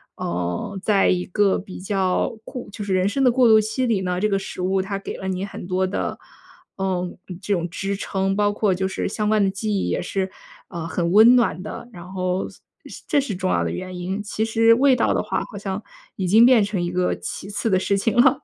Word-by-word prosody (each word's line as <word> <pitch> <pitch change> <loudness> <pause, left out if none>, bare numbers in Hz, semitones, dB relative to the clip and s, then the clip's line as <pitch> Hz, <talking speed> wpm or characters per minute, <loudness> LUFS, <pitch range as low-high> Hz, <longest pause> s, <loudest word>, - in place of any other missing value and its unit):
呃， 90 - -3
在 200 -1 +3
一 180 -1 +1
个 200 +1 +2
比 190 0 -9
较 190 -1 0
过 250 +2 -8
就 210 - -6
是 195 -2 0
人 185 +1 +2
生 270 +7 0
的 250 - +5
过 250 0 +4
渡 220 -1 +7
期 220 +5 -1
里 225 -5 +1
呢， 180 -1 -1
这 210 - +2
个 195 -2 0
食 195 - -8
物 190 +1 +1
它 195 +1 -3
给 195 - -6
了 190 - -6
你 190 0 -2
很 195 -3 -8
多 185 0 +1
的， 185 - -3 0.6
呃， 190 -2 -1 0.3
嗯， 180 -2 -8
这 200 +2 -1
种 175 -2 -1
支 195 +3 -3
撑。 195 -1 -1
包 205 0 +2
括 205 -1 +1
就 190 +1 -1
是 190 - -3
相 210 +1 -1
关 215 -1 +3
的 195 - +2
记 210 +3 -3
忆 200 -2 0
也 - - -1
是， 190 -1 -2 0.4
呃， 170 -2 -5
很 170 0 -1
温 220 +5 +8
暖 225 -8 +2
的。 210 - -7
然 175 0 -10
后 185 0 -1
所 - - -17 0.3
是 - - -10
这 295 - +3
是 265 -8 -2
重 185 0 -2
要 - - +1
的 - - -2
原 185 0 -6
因， 185 +3 -3
其 215 +1 -2
实 225 0 +4
味 265 +2 +4
道 - - +1
的 - - 0
话 - - -1
好 205 - -8
像 200 +1 -4 0.3
已 190 - -1
经 220 +6 +7
变 245 -4 +6
成 200 -1 -2
一 175 - -2
个 180 0 0
其 195 - -7
次 210 - -2
的 190 -4 +3
事 200 +1 +1
情 200 +2 0
了。 265 +3 +4
195 Hz, 265 characters per minute, -22 LUFS, 185-215 Hz, 0.6 s, 温